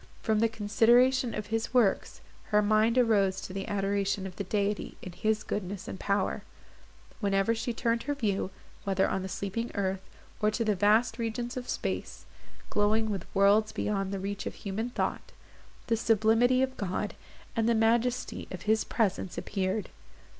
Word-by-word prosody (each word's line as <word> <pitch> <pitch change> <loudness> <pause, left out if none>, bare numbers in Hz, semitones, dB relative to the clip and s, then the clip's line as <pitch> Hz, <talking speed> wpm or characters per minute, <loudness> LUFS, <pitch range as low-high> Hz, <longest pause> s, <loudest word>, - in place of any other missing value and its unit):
From 220 -1 +2
the 230 +1 +3
consideration 235 +4 +3
of 210 +1 -5
His 225 +2 -1
works, 225 -6 +2 0.2
her 210 0 +3
mind 215 +3 +3
arose 200 -6 +3
to 185 - -7
the 195 0 -4
adoration 200 -1 0
of 185 -2 -7
the 200 - -3
Deity, 205 +1 -2
in 185 - -6
His 215 +4 0
goodness 195 -1 -4
and 190 - -6
power; 200 -1 0 0.8
wherever 200 0 +2
she 230 +2 -2
turned 230 0 0
her 290 - +1
view, 205 -8 -1 0.3
whether 195 -1 +2
on 190 - -1
the 190 - -5
sleeping 200 +5 -3
earth, 190 -2 -1 0.4
or 210 - +4
to 225 +2 -1
the 215 - +3
vast 220 +4 +3
regions 235 +1 -3
of 250 -1 -5
space, - - -3 0.5
glowing 215 +1 +2
with 195 -4 -4
worlds 200 +2 +4
beyond 195 -2 -1
the 200 - -2
reach 200 +1 -4
of - - -5
human 215 +4 -3
thought, - - -3 0.5
the 230 - +2
sublimity 225 +3 +3
of 260 0 -3
God, 200 +1 -2 0.4
and 225 0 +2
the 235 - +3
majesty 235 +2 +1
of 185 - -7
His 220 +1 +2
presence 195 -5 -1
appeared. 190 +3 -2
210 Hz, 170 wpm, -29 LUFS, 195-230 Hz, 0.8 s, or